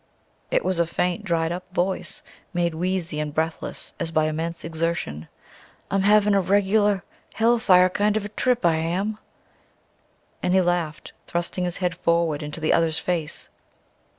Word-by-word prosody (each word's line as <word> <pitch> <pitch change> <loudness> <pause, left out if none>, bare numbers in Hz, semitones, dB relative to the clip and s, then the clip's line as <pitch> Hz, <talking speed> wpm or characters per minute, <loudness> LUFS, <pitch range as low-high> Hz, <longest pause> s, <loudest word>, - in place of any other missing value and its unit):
It - - +1
was 185 -2 0
a 170 - +2
faint, 180 +4 -1
dried 165 -4 0
up 180 +1 -4
voice, 185 +2 -1 0.3
made 170 -1 +1
wheezy 175 -2 0
and 150 -1 -2
breathless 160 +2 -2
as 170 - -2
by 155 -1 +2
immense 165 +2 -3
exertion. 160 - -2 0.6
"I'm 195 0 +2
havin' 210 +1 +4
a 200 - +4
reg'lar 200 +1 +2 0.3
hellfire 220 -6 +5
kind 205 +3 +1
of 210 - -3
a - - -5
trip, 245 0 0
I 165 -2 +4
am." 190 +7 -1 1.2
And 180 +1 +1
he 190 - +6
laughed, 175 -3 -1
thrusting 175 +1 -2
his 175 -1 -2
head 180 -2 0
forward 170 -3 +1
into 150 +2 -5
the 155 - +2
other's 160 -2 +2
face. 165 -4 -2
175 Hz, 155 wpm, -24 LUFS, 165-195 Hz, 1.2 s, he